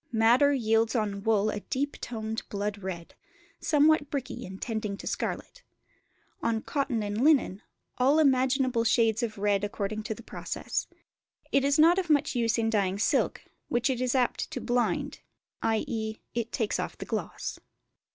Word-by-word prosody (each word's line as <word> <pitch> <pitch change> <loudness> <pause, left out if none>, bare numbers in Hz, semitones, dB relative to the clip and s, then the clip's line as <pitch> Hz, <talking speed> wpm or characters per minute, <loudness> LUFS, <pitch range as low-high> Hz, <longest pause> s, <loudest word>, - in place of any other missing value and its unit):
Madder 240 +5 +5
yields 225 -3 +2
on 205 -3 -1
wool 215 0 +2
a 210 - -3
deep 280 +7 -2
toned 220 -1 -4
blood 205 0 -3
red, 175 -3 -6 0.5
somewhat 300 -1 +3
bricky 265 -8 -4
and 190 +1 -9
tending 215 -4 -3
to - - -10
scarlet. - - -4 0.8
On 225 -1 0
cotton 265 -6 -1
and 205 +3 -1
linen, 275 -10 +3 0.4
all 270 +4 +4
imaginable 260 -4 +3
shades 225 0 +3
of 225 -3 -3
red 200 0 +1
according 205 +1 -3
to 220 0 -4
the 235 - -12
process. - - -4 0.6
It 275 - +3
is 280 0 +3
not 335 +4 +6
of 355 -3 -3
much 290 -2 +3
use 230 -3 +1
in 225 -1 +1
dyeing 195 -3 +1
silk, 205 - +1 0.2
which 240 +3 +1
it 250 -1 -2
is 255 0 0
apt 250 -2 +1
to - - -4
"blind"; 245 -1 -1 0.4
i.e. 220 0 -1 0.2
it 235 -1 -2
takes 220 -3 -1
off - - -4
the - - -6
gloss. - - -4
230 Hz, 160 wpm, -28 LUFS, 215-265 Hz, 0.8 s, not